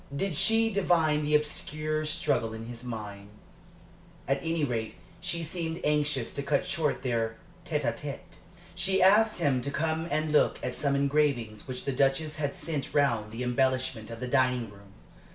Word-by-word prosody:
Did 185 +2 -1
she 225 +6 +3
divine 165 -6 +2
the 150 +1 +2
obscure 155 +1 0
struggle 115 -7 +1
in 110 0 -7
his 120 0 -9
mind? 105 -4 -7 1.0
At 135 +1 +1
any 165 -1 -1
rate 115 -4 -3 0.2
she 170 -1 -2
seemed 165 0 -3
anxious 150 -4 +1
to 140 - -2
cut 140 +3 +1
short 165 -7 -1
their 115 -3 0 0.3
tête - - -1
à - - 0
tête. - - -8 0.4
She 190 0 +1
asked 215 +3 +5
him 140 -6 +1
to 140 - -3
come 160 +3 -1
and 155 -1 0
look 150 - +3
at - - -4
some 140 -1 +2
engravings 140 -6 +1
which 125 -1 -5
the 140 - 0
Duchess 140 +4 +1
had 145 -2 -2
sent 150 -2 -3
round 120 -7 +3
for - - -15
the 115 +3 -4
embellishment 130 -2 0
of 115 0 -7
the 125 - -4
dining 125 -4 +1
room. 100 -1 -16
140 Hz, 175 wpm, -29 LUFS, 125-155 Hz, 1.0 s, asked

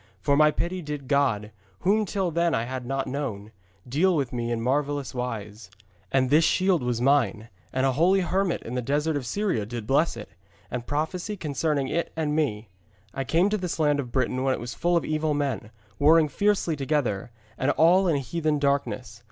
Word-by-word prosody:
For 140 - +2
my 150 +1 +6
pity 175 +4 -2
did 150 -4 -6
God, 125 -7 +1 0.3
whom 210 +3 +2
till 190 -2 -1
then 170 +1 +1
I 115 - 0
had 125 0 -5
not 135 0 -1
known, 115 -7 -4 0.4
deal 170 +9 +2
with 135 -5 -1
me 120 -1 -2
in 115 - -1
marvellous 140 +3 -1
wise. 110 -4 -5 0.4
And 130 -1 +2
this 155 +3 +6
shield 185 0 +2
was 125 -2 -1
mine, 120 -4 +2 0.2
and 130 +1 0
a 135 - +3
holy 180 +8 +3
hermit 185 0 0
in 120 - -6
a 125 - 0
desert 150 +5 0
of 135 -4 -3
Syria 200 - 0
did 115 +1 -6
bless 140 +3 +2
it, 105 - -8 0.4
and 120 -1 -4
prophesy 170 +8 -2
concerning 150 -3 -1
it 170 +5 -2
and 155 -2 -1
me. 115 -9 -1 0.5
I 135 - -2
came 165 +8 +2
to 215 - 0
this 180 -2 -3
land 150 -2 +2
of 125 -4 -4
Britain 130 0 0
when 135 -1 +2
it - - -7
was 120 0 -6
full 175 +5 +1
of 170 - -1
evil 155 -1 0
men, 140 -6 -2 0.3
warring 155 +1 +5
fiercely 200 -3 +1
together, 135 -8 -1 0.3
and 130 - 0
all 175 +6 +4
in 165 - +2
heathen 155 +2 -1
darkness. 140 -6 -1
145 Hz, 195 wpm, -26 LUFS, 125-165 Hz, 0.5 s, my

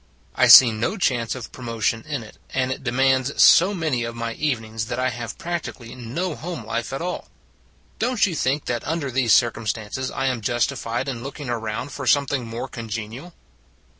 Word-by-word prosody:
I - - +4
see 125 -3 +10
no 115 - -2
chance 125 - 0
of 125 - -8
promotion 115 -2 -2
in 145 -6 -3
it, 105 - -15 0.2
and 130 -1 +1
it 130 - -5
demands 130 +1 +1
so 190 +4 +7
many 155 -9 -1
of 115 0 -5
my 115 0 -3
evenings 115 -7 -2
that 120 0 -3
I 130 0 +1
have 115 -1 -6
practically 165 -9 -5
no 130 +9 -4
home 165 -7 -6
life 115 +1 -3
at 135 +4 -4
all. 180 0 -4 0.7
Don 250 0 0
t 200 - +3
you - - -4
think 140 0 0
that 120 -2 -2
under 155 -3 -2
these 125 -3 +1
circumstances 115 +1 +1
I 135 - -3
am 125 -3 0
justified 120 +2 -1
in 125 -4 -4
looking 135 0 -6
around 110 +3 -3
for 135 -1 -6
something 135 0 +2
more 115 +3 -5
con 115 -3 -8
genial? 115 +10 -6
125 Hz, 190 wpm, -23 LUFS, 115-140 Hz, 0.7 s, see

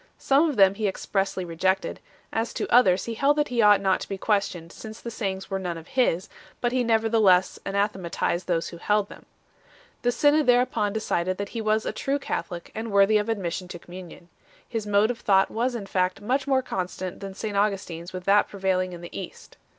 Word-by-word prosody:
Some 285 +4 +3
of 290 - -3
them 195 -2 +6
he 210 +1 -1
expressly 195 -1 -2
re 165 -1 -8
jected; 190 +3 0 0.4
as 225 +1 -2
to - - -2
others, 190 -7 +5
he 230 - -4
held 280 +6 +2
that 295 0 +1
he 240 -2 +1
ought 210 -1 +6
not 190 -1 +1
to - - -8
be 195 - -3
questioned, 190 -5 -1
since 220 0 -10
the 235 - -7
sayings 195 -3 -4
were 195 - -1
none 175 -3 -4
of 165 - -12
his; 245 -9 +1 0.3
but 240 - 0
he 255 0 +1
nevertheless 220 -5 +3
anathematized 195 -3 -1
those 170 -2 0
who 170 - -10
held 205 +3 +1
them. - - -14 0.7
The 245 - +2
synod 295 +3 +3
thereupon 245 -4 +3
decided 185 -4 -1
that 200 0 -4
he 230 - -4
was 215 0 +1
a - - -1
true 275 +1 -1
Catholic, 175 -10 -5
and 220 0 -5
worthy 200 +2 +5
of 210 +2 -3
admission 185 -4 -2
to 175 - -7
communion 175 0 -12 0.3
3. - - -38
His 225 -3 -3
mode 205 +2 +3
of 240 - -7
thought 195 -1 +3
was 245 +2 -1
in 215 -4 -5
fact 185 -1 0
much 255 +7 -1
more 265 -1 +2
consonant 185 -4 -4
than 195 -1 -7
St 210 0 -4
Augustin 195 -5 0
s 175 +2 -10
with 185 -1 -6
that 200 +2 +4
prevailing 185 -2 -1
in 170 - -9
the 175 - -10
East. 190 - -9
200 Hz, 215 wpm, -25 LUFS, 185-225 Hz, 0.7 s, them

